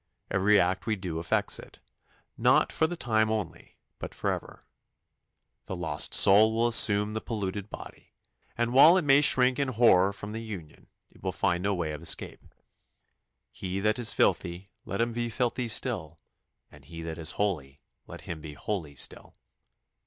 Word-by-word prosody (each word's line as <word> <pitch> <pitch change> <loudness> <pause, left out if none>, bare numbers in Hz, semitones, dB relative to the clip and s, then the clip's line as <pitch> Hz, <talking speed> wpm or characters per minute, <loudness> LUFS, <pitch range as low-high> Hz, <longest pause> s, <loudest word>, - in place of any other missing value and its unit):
Every 100 +2 +3
act 90 +4 -1
we 110 - +1
do 90 -5 -5
affects 85 - 0
it, - - -14 0.6
not - - +3
for 160 - +1
the 175 +1 -6
time 110 -5 +1
only, 100 -8 -5 0.2
but - - -8
for - - -1
ever. - - -7 1.0
The 95 - -6
lost 80 -4 0
soul 110 +3 +6
will 115 +1 +2
assume 105 -3 +3
the 110 - -4
polluted 100 -2 -5
body, - - -12 0.4
and 120 0 -1
while 155 +7 +7
it 185 - 0
may 140 0 +5
shrink 130 -2 +3
in 140 - 0
horror 110 -6 +4
from 105 +1 -9
the 110 +1 -5
union, 95 -9 -10 0.3
will - - -2
find 90 0 -1
no 100 +1 0
way 85 -3 -3
of 75 - -7
escape. 85 - -1 1.1
"He 95 -1 -5
that 105 +3 0
is 115 -2 +3
filthy, 90 +3 -1
let 100 - -3
him 115 0 -1
be 120 0 -3
filthy 120 +2 -2
still: 80 -7 -2 0.5
and 75 -1 -17
he 80 +3 -10
that 80 0 -6
is 80 +1 +1
holy, 75 -9 -3 0.2
let - - -10
him 80 -2 -7
be 75 -1 -9
holy 80 -8 -5
still." - - -4
100 Hz, 170 wpm, -27 LUFS, 85-115 Hz, 1.1 s, while